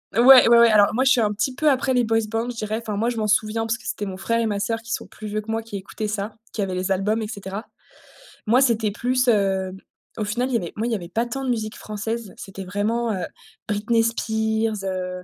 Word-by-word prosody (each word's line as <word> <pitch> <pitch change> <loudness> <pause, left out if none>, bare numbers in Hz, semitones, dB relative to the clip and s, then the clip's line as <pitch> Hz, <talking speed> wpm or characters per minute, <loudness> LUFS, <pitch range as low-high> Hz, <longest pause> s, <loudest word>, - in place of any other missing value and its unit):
Ouais, 235 - +4
ouais, 260 +1 +9
ouais, 235 -1 +7
alors 205 -1 +5
moi 255 - +2
je 270 - +4
suis 245 - +4
un 210 -2 +2
petit 220 +5 -1
peu 300 +4 +2
après 265 -1 +1
les 250 -1 +3
boys 225 0 +1
band 225 +2 -2
je 245 - -5
dirais, 215 0 -2
enfin 215 -3 -4
moi 230 +3 +1
je 235 - -6
m'en 215 -1 0
souviens 220 +1 +1
parce 225 +1 0
c'était 205 - -4
mon 190 -1 -6
frère 230 +4 0
et 230 - +1
ma 205 -2 -1
soeur 225 +3 -2
qui 230 0 -10
sont - - -2
plus 215 - -10
vieux 210 +1 -2
que 215 +1 -6
moi 225 0 -1
qui 225 -2 -7
écoutaient 205 +3 -5
ça, 210 0 -4 0.2
qui 210 - -2
avaient 190 -1 -3
les 185 +1 -2
albums 210 +4 +1
et 215 - -3
cetera. 200 -1 -6 0.8
Moi 240 +4 +4
c'était 225 -5 +2
plus, 250 +4 0
heu, 195 -4 +2 0.5
au - - 0
final 230 +5 -1
il - - -4
y - - +4
avait 175 -6 -5
moi 220 - -2
il 240 - -1
y - - +1
avait 175 -4 -6
pas 225 +6 0
tant 270 +3 -5
de - - -2
musique 220 -3 -2
française. 215 0 -5
C'était 195 0 -8
vraiment, 215 +5 -1
heu, 190 -3 -2 0.4
Britney 225 +2 +1
Spears, 220 -2 -1
heu 185 -1 -4
220 Hz, 265 wpm, -23 LUFS, 205-230 Hz, 0.8 s, ouais